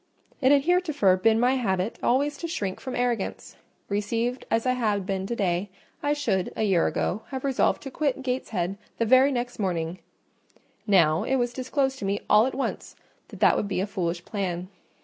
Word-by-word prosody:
It 260 0 +5
had 280 -1 +5
heretofore 310 - +3
been 220 +4 +3
my 250 +2 +3
habit 190 -3 -1
always 285 +4 +2
to 335 - -3
shrink 200 - -3
from 260 -1 -5
arrogance: 245 -4 -2 0.3
received 230 +5 -2
as 225 +1 +1
I 255 - +3
had 210 -6 0
been 190 0 -2
to 235 - -2
day, 185 -1 0 0.3
I 290 0 +1
should, 195 -11 -1
a - - -1
year 190 -5 +3
ago, 205 - -1
have 265 -1 -5
resolved 270 -2 +1
to 270 - -7
quit 275 -2 -1
Gateshead 200 -7 -2 0.2
the 230 - +1
very 260 +4 +5
next 245 -2 -3
morning; 175 -3 -2 0.9
now, 170 -5 +4
it 265 - 0
was 245 -2 0
disclosed 265 +1 -1
to - - -4
me 200 +1 0
all 215 +3 +6
at 265 - -4
once 270 - -4 0.3
that - - -12
that - - +6
would 205 - -1
be 200 - -2
a 190 - +1
foolish 175 -3 -3
plan. 185 -3 -3
225 Hz, 190 wpm, -26 LUFS, 190-260 Hz, 0.9 s, all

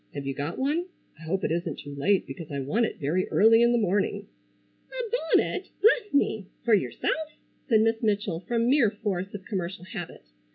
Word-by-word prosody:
Have 140 - -5
you 135 - -2
got 145 +5 -4
one? 305 +7 0 0.3
I 165 - -11
hope 190 +4 -1
it - - 0
isn't 170 +1 -2
too 145 - -8
late 185 +8 +1
because 165 -4 -8
I 140 - -3
want 215 - +1
it - - -8
very 160 +6 0
early 225 +2 +5
in 235 0 +5
the 240 - +3
morning." 205 -2 0 0.7
"A - - -3 0.3
bonnet! - - -1
Bless 430 0 +3
me! 220 -8 +1 0.2
For 235 - +4
yourself?" 210 - 0 0.3
said 220 -3 +5
Miss 225 0 +1
Mitchell 205 -6 0
from 235 0 +1
mere 255 -4 +4
force 195 -3 -3
of 190 -2 -8
commercial 185 -3 -4
habit. 185 - -7
205 Hz, 195 wpm, -27 LUFS, 170-235 Hz, 0.7 s, early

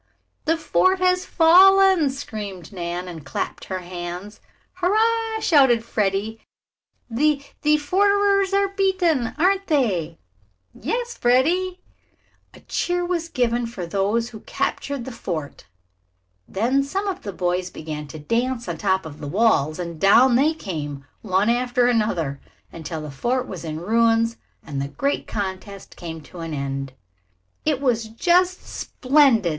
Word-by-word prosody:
"The 325 +1 +2
fort 370 +3 +2
has 365 0 +1
fallen!" 375 -1 +6
screamed 210 - -7
Nan, 175 0 -4
and 165 -4 -8
clapped - - -4
her 185 -1 -4
hands. 180 +3 -7 0.4
"Hurrah!" 445 +4 +1
shouted 265 - +4
Freddie. 210 +1 -1 0.7
"The 280 +4 +1 0.2
the 300 0 +4
forters 395 +4 +2
are 395 0 +2
beaten, 375 - +1
aren't 385 +4 +2
they?" 185 - 0 0.6
"Yes, 475 - -3
Freddie." 350 +10 +2 0.7
A - - -16
cheer 355 0 -1
was 340 -2 -2
given 240 -3 0
for 210 -7 -6
those 205 +6 0
who 220 -3 -10
had - - -26
captured 280 -4 -2
the 260 - -6
fort. 160 - -6 0.8
Then 245 +8 +1
some 385 +9 -3
of 385 - -3
the 200 - -5
boys 180 0 -1
began 150 -2 -7
to 150 - -9
dance 235 - -1
on - - -3
the - - -12
top 190 -3 +1
of 150 -2 -9
the 145 - -6
walls, 155 -5 +2
and 170 -3 -6
down 240 +6 +6
they 300 +6 +3
came, 145 - -6 0.2
one 195 0 +1
after 245 +1 +2
another, 195 - 0 0.3
until 160 -1 -6
the 150 -1 -7
fort 250 - -1
was 180 -4 -7
in 155 -1 -4
ruins, 230 +4 +2 0.3
and 140 -3 -4
the 140 - -2
great 280 - -2
contest 195 -1 -5
came 165 -2 -7
to 175 +4 -13
an 165 -2 -4
end. 135 -1 -4 0.7
"It 300 -4 +1
was 240 -5 +1
just 355 +11 +1
splendid!" 260 - +2
230 Hz, 145 wpm, -22 LUFS, -, 0.8 s, fallen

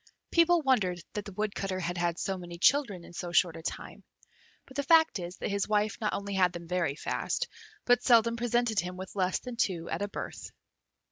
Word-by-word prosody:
People 335 -1 +4
wondered 200 -10 +2
that 210 -1 -4
the 200 - -7
Woodcutter 195 -1 -2
had 175 0 -2
had 175 -1 0
so 195 - -2
many 175 -2 -8
children 210 -4 +3
in - - -13
so 175 0 -5
short 175 -1 +3
a 165 - -8
time; - - -6 0.6
but 265 - -15
the 285 - +1
fact 320 - +4
is, 175 +1 -6
that - - -3
his 200 -1 0
wife 210 +2 0
not 210 - 0
only 200 0 -3
had 185 -2 +3
them 170 -1 -8
very 170 -5 0
fast, - - -2 0.4
but 245 0 +4
seldom 235 -2 +4
presented 235 -2 +1
him 180 +1 -4
with 190 +2 -8
less 185 -1 +1
than 250 -2 -7
two 170 -6 0
at - - -2
a 205 - 0
birth. - - -6
200 Hz, 210 wpm, -30 LUFS, 180-235 Hz, 0.6 s, People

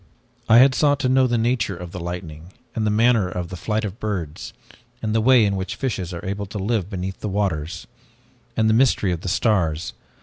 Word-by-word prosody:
"I 115 - +8
had 130 +2 +7
sought 145 0 +2
to 130 - +1
know 130 0 +4
the 120 -1 +1
nature 115 -4 0
of 90 -1 -8
the 90 - -6
lightning, 85 0 -7 0.2
and 110 -1 -1
the - - +3
manner 110 -2 +3
of 90 -1 -5
flight 105 +5 -2
of 100 - -3
the 100 - -19
birds, 95 0 -4 0.5
and 110 -2 -2
the 110 - +2
way 125 -1 +5
in 100 -1 0
which 95 -1 -4
fishes 100 -9 -3
are 85 0 -7
able 100 +1 -3
to 105 - -6
live 100 -1 -1
beneath 95 -1 -5
the 105 - -4
waters, 90 -4 -2 0.7
and 110 - +3
the 110 - +4
mystery 115 -5 +3
of 85 -2 -3
the 95 - -3
stars. 85 -7 0
100 Hz, 215 wpm, -22 LUFS, 90-115 Hz, 0.7 s, I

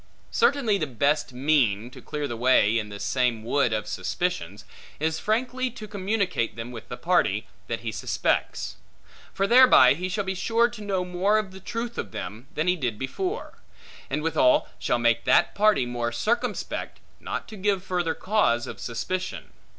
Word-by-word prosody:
Certainly, 275 - +2
the 155 - -1
best 140 +3 +1
mean, 125 -5 +1
to 130 -1 -12
clear 150 +2 -4
the 120 - -4
way 115 -2 +4
in 105 -1 -5
this 100 0 -7
same 125 -4 0
wood 120 +1 +1
of 110 -1 -1
suspicions, 105 - -3 0.3
is 160 +1 0
frankly 250 +4 0
to 230 -3 -9
communicate 200 - -1
them 115 +1 -6
with 115 -3 -10
the 125 - -5
party, 120 - +1 0.2
that 115 - -3
he 115 -1 -3
suspects; - - -1 0.5
for 195 - 0
thereby 240 - +7
he 180 +5 -4
shall 205 +2 -1
be 190 0 -2
sure 230 +5 +2
to 235 -3 -10
know 195 -3 -1
more 185 +4 +2
of 210 -3 -2
the 190 - -10
truth 235 +4 -5
of 100 - -5
them, 105 +7 -6
than 155 +3 0
he 180 - +4
did 125 -10 -2
before; 375 - -4 0.5
and 150 - -2
withal 155 -6 +3
shall 120 - +1
make 120 -1 +2
that - - +4
party 210 -10 +3
more 120 -1 -2
circumspect, 215 - -2 0.2
not - - -5
to 220 - -9
give 195 -1 0
further 175 -3 -1
cause 185 - +1
of - - -8
suspicion. 155 +11 -4
160 Hz, 175 wpm, -26 LUFS, -, 0.5 s, thereby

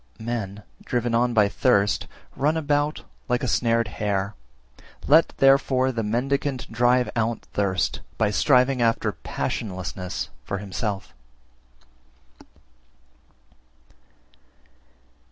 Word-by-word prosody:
343. 120 +2 -3
Men, 100 -2 -6 0.2
driven 120 -1 -1
on 120 +1 +2
by 105 -2 +5
thirst, 100 -2 +2 0.3
run 150 +4 +1
about 145 0 0 0.3
like 125 +1 +1
a - - 0
snared 115 -2 +2
hare; 100 +1 -2 0.7
let 160 +3 +6
therefore 135 -1 +4
the 115 -2 -2
mendicant 130 +4 -1
drive 125 +2 +3
out 115 0 0
thirst, 95 -2 0 0.2
by 105 -2 +2
striving 125 +1 +3
after 115 -1 +2
passionlessness 95 -2 -4
for 100 - -3
himself. 100 0 -4
115 Hz, 100 wpm, -24 LUFS, 105-130 Hz, 0.7 s, let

